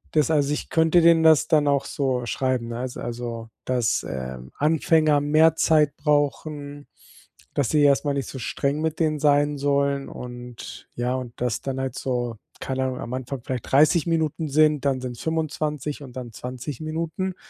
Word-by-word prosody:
Das 150 Hz, -1 st, +3 dB
also, 145 Hz, -2 st, +2 dB
ich -, -, -4 dB
könnte 160 Hz, +1 st, +4 dB
denen 165 Hz, -1 st, +5 dB
das 160 Hz, -2 st, +5 dB
dann 150 Hz, -3 st, +3 dB
auch 140 Hz, -1 st, +2 dB
so 130 Hz, -3 st, -1 dB
schreiben, 130 Hz, -1 st, -1 dB
ne? 120 Hz, +1 st, -4 dB
S 130 Hz, -1 st, -5 dB
also, 115 Hz, -1 st, -5 dB, 0.2 s
dass, 125 Hz, -3 st, +1 dB
ähm, 65 Hz, -1 st, -6 dB
Anfänger 155 Hz, -1 st, +3 dB
mehr 155 Hz, +2 st, +4 dB
Zeit 155 Hz, -3 st, +3 dB
brauchen. 145 Hz, 0 st, -1 dB, 0.7 s
Dass 140 Hz, -5 st, +1 dB
sie 150 Hz, -, +3 dB
erstmal 145 Hz, 0 st, +3 dB
nicht 140 Hz, -, -3 dB
so -, -, -7 dB
streng 140 Hz, +4 st, -1 dB
mit 160 Hz, 0 st, -2 dB
denen 155 Hz, -2 st, +1 dB
sein 145 Hz, 0 st, +3 dB
sollen 140 Hz, 0 st, 0 dB
und 120 Hz, -1 st, -9 dB
ja, 120 Hz, +1 st, -1 dB
und 125 Hz, -2 st, -6 dB
dass 125 Hz, -2 st, -1 dB
dann 135 Hz, -1 st, -3 dB
halt 130 Hz, -2 st, -3 dB
so, 120 Hz, -3 st, -2 dB, 0.2 s
keine 130 Hz, 0 st, -2 dB
Ahnung, 130 Hz, -1 st, -3 dB
am 120 Hz, -, -6 dB
Anfang 130 Hz, 0 st, -4 dB
vielleicht 125 Hz, -1 st, -5 dB
30 150 Hz, +4 st, +4 dB
Minuten 160 Hz, -1 st, 0 dB
sind, 150 Hz, 0 st, +3 dB
dann 135 Hz, -2 st, +1 dB
sind 125 Hz, -2 st, -5 dB
es -, -, -10 dB
25 150 Hz, -2 st, -2 dB
und 125 Hz, -3 st, -11 dB
dann 125 Hz, -2 st, -6 dB
20 125 Hz, +4 st, -6 dB
Minuten. 165 Hz, +4 st, -3 dB
140 Hz, 180 wpm, -24 LUFS, 125-155 Hz, 0.7 s, denen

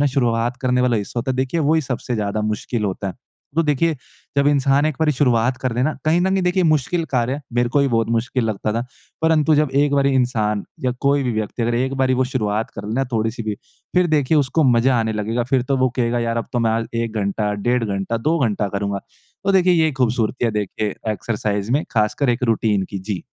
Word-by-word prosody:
ना -, -, +4 dB
शुरुआत 120 Hz, -2 st, +1 dB
करने 125 Hz, -1 st, +1 dB
वाला 125 Hz, -2 st, +2 dB
हिस्सा 105 Hz, +3 st, -4 dB
होता 130 Hz, +3 st, -2 dB
है 130 Hz, -, -1 dB
देखिए 130 Hz, +5 st, 0 dB
वही 155 Hz, +2 st, +3 dB
सबसे 125 Hz, -3 st, -3 dB
ज़्यादा 105 Hz, -1 st, -1 dB
मुश्किल 105 Hz, +1 st, -2 dB
होता 100 Hz, 0 st, -3 dB
है। 90 Hz, -, -6 dB, 0.4 s
तो 165 Hz, -, +4 dB
देखिए 155 Hz, +2 st, +1 dB, 0.4 s
जब 140 Hz, 0 st, +3 dB
इंसान 140 Hz, 0 st, +3 dB
एक 155 Hz, -3 st, -2 dB
बारी 155 Hz, -1 st, +3 dB
शुरुआत 125 Hz, -2 st, +2 dB
कर 130 Hz, -, 0 dB
लेना 130 Hz, +6 st, +1 dB
कहीं 160 Hz, +3 st, +3 dB
न 190 Hz, +2 st, +1 dB
कहीं 190 Hz, 0 st, +1 dB
देखिए 180 Hz, +1 st, +2 dB
मुश्किल 160 Hz, +2 st, +1 dB
कार्य 125 Hz, -1 st, +1 dB
है 145 Hz, +2 st, -4 dB
मेरे 120 Hz, 0 st, +2 dB
को 135 Hz, -, +1 dB
भी 140 Hz, -, +2 dB
बहुत 115 Hz, -2 st, +1 dB
मुश्किल 115 Hz, +1 st, 0 dB
लगता 110 Hz, -1 st, -1 dB
था 115 Hz, +2 st, -1 dB, 0.4 s
परंतु 160 Hz, -1 st, +3 dB
जब 150 Hz, -1 st, +2 dB
एक 145 Hz, -1 st, +1 dB
बारी 140 Hz, 0 st, +3 dB
इंसान 110 Hz, -5 st, 0 dB, 0.2 s
या 125 Hz, -, +2 dB
कोई 140 Hz, 0 st, +2 dB
भी 125 Hz, -2 st, -1 dB
व्यक्ति 110 Hz, +2 st, -3 dB
अगर 120 Hz, +1 st, 0 dB
एक 130 Hz, +3 st, 0 dB
बारी 130 Hz, 0 st, +3 dB
वो 130 Hz, +1 st, +2 dB
शुरुआत 110 Hz, -3 st, -1 dB
कर 100 Hz, -1 st, -8 dB
लेना 120 Hz, +6 st, 0 dB
थोड़ी-सी 115 Hz, +1 st, -1 dB
भी 110 Hz, -1 st, -2 dB, 0.4 s
फ़िर 180 Hz, 0 st, +4 dB
देखिए 155 Hz, -1 st, +2 dB
उसको 145 Hz, +3 st, +1 dB
मज़ा 125 Hz, 0 st, +4 dB
आने 110 Hz, -1 st, -1 dB
लगेगा। 110 Hz, +3 st, -1 dB
फ़िर 130 Hz, -2 st, +3 dB
तो 135 Hz, -, +2 dB
वो 130 Hz, 0 st, +3 dB
कहेगा 120 Hz, -1 st, +1 dB
यार 115 Hz, 0 st, -1 dB
अब 115 Hz, -, -2 dB
तो 120 Hz, -, 0 dB
मैं 115 Hz, -1 st, +2 dB
आज 115 Hz, 0 st, 0 dB
1 115 Hz, -1 st, -2 dB
घंटा, 105 Hz, +1 st, -1 dB
डेढ़ 120 Hz, +4 st, 0 dB
घंटा, 100 Hz, +2 st, -2 dB
2 155 Hz, +9 st, 0 dB
घंटा 105 Hz, -1 st, -1 dB
करूँगा। 100 Hz, 0 st, -2 dB, 0.5 s
तो 195 Hz, -, +2 dB
देखिए 185 Hz, -1 st, +4 dB
ये 155 Hz, -, +1 dB
खूबसूरती 125 Hz, -2 st, 0 dB
है 115 Hz, -, +2 dB
देखिए 105 Hz, 0 st, -2 dB, 0.2 s
एक्सरसाइज़ 105 Hz, -1 st, -2 dB
में 145 Hz, +4 st, +1 dB
ख़ासकर 110 Hz, +5 st, +1 dB
एक 120 Hz, +2 st, -2 dB
रूटीन 110 Hz, -4 st, +1 dB
की। 100 Hz, -, -4 dB
जी। 95 Hz, -2 st, -4 dB
120 Hz, 230 wpm, -20 LUFS, 110-140 Hz, 0.5 s, ना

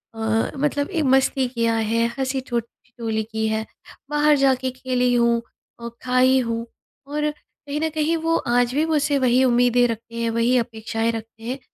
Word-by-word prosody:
अ, 225 Hz, 0 st, 0 dB
मतलब 285 Hz, +2 st, 0 dB
ए 335 Hz, -5 st, -1 dB
मस्ती 265 Hz, 0 st, +2 dB
किया 230 Hz, -2 st, 0 dB
है 225 Hz, +1 st, +1 dB
हँसी 265 Hz, 0 st, -1 dB
ठोट 235 Hz, -1 st, 0 dB, 0.2 s
ठिठोली 225 Hz, -3 st, -3 dB
की 220 Hz, 0 st, -1 dB
है। 220 Hz, 0 st, -1 dB, 0.4 s
बाहर 295 Hz, 0 st, +4 dB
जाके 260 Hz, -1 st, +2 dB
खेली 250 Hz, -1 st, 0 dB
हूँ, 235 Hz, -1 st, +3 dB, 0.4 s
और 235 Hz, 0 st, -6 dB
खाई 255 Hz, +1 st, +3 dB
हूँ 230 Hz, -1 st, -2 dB, 0.4 s
और, 300 Hz, +1 st, -1 dB
कहीं 295 Hz, 0 st, -8 dB
न 320 Hz, -, +1 dB
कहीं 315 Hz, +1 st, 0 dB
वो 330 Hz, 0 st, +2 dB
आज 245 Hz, +1 st, +2 dB
भी 310 Hz, +2 st, +2 dB
मुझसे 300 Hz, -2 st, +1 dB
वही 255 Hz, 0 st, +3 dB
उम्मीदें 245 Hz, 0 st, +4 dB
रखते 230 Hz, 0 st, -6 dB
हैं 230 Hz, 0 st, -1 dB
वही 235 Hz, +2 st, +2 dB
अपेक्षाएँ 225 Hz, 0 st, -1 dB
रखते 225 Hz, 0 st, -8 dB
हैं 255 Hz, +4 st, -4 dB
245 Hz, 175 wpm, -22 LUFS, 230-275 Hz, 0.4 s, बाहर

